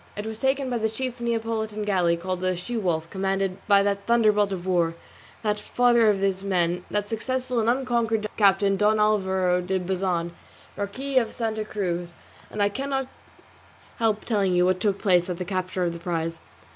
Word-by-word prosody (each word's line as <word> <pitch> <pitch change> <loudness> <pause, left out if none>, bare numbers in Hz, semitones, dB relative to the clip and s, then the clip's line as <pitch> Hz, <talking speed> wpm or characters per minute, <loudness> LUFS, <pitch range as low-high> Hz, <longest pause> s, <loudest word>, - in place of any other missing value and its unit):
It 205 - -4
was 220 0 -5
taken 265 +1 +1
by 240 - 0
the 220 0 0
chief 250 +2 -5
Neapolitan 225 -2 -2
galley 180 -4 +2
called 185 +1 -4
the 185 0 +1
She 180 +8 -5
wolf, 170 -7 -1
commanded 195 0 -1
by 200 -1 +5
that 200 0 -1
thunderbolt 215 -3 +3
of 185 -2 -4
war, 170 -3 +1 0.5
that 210 -1 0
father 235 +1 +3
of 205 - +2
his 195 -1 0
men, 180 -2 0
that 205 0 -1
successful 250 +3 -2
and 225 0 +2
unconquered 235 -4 0
captain 195 -1 +3
Don 215 +1 +3
Alvaro 190 -4 +2
de 185 +2 -1
Bazan, 180 -2 -1 0.4
Marquis 260 +7 0
of 230 -3 -2
Santa 220 -2 -2
Cruz; 175 -5 -3 0.3
and 210 - -1
I - - +4
cannot 270 +3 -3 0.9
help 220 -2 0
telling 200 -5 +1
you 180 0 +4
what 185 0 +2
took 200 0 +1
place 180 -3 +2
at 180 - -3
the 180 - -4
capture 185 0 -2
of 170 -1 0
the 170 - -7
Prize. 165 -1 -3
200 Hz, 185 wpm, -25 LUFS, 185-225 Hz, 0.9 s, by